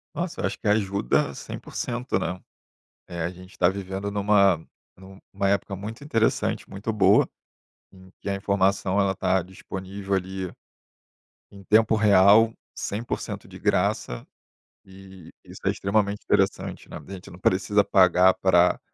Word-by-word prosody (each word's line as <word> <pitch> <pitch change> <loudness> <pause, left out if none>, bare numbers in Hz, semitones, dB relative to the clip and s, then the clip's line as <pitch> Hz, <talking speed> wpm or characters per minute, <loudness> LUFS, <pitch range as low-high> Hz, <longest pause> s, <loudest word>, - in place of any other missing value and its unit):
Nossa, 175 0 -3
eu - - 0
acho - - -3
que 110 - -5
ajuda 100 - +1
100%, 120 -4 -4
né. 90 -1 -4 0.7
Eh, 85 -1 -6
a 85 - -1
gente 90 +1 -14
tá 90 - +4
vivendo 95 +1 -4
numa 100 -4 +3 0.7
numa 100 - 0
época 100 0 -1
muito 110 +7 -8
interessante, 115 -6 0
muito 100 +3 -4
boa, 105 -3 +4 0.6
em 95 -1 -17
que - - -6
a 100 - 0
informação, 100 0 +1
ela 100 -1 +2
está 95 0 +1
disponível, 95 +2 -8
ali, 95 -1 -3 1.0
em 100 -1 -13
tempo 110 +2 +4
real, 105 +1 +5 0.2
100% 110 +4 -5
de - - -11
graça, - - -1 0.6
e 95 -2 -14
isso - - -13
é - - +3
extremamente 100 0 -1
interessante, 100 -1 -1
né. - - -7
A - - -13
gente 95 -2 -9
não 90 - -12
precisa 95 +2 +2
pagar 95 -1 +5
pra 90 -1 +3
95 Hz, 145 wpm, -25 LUFS, 95-105 Hz, 1.0 s, real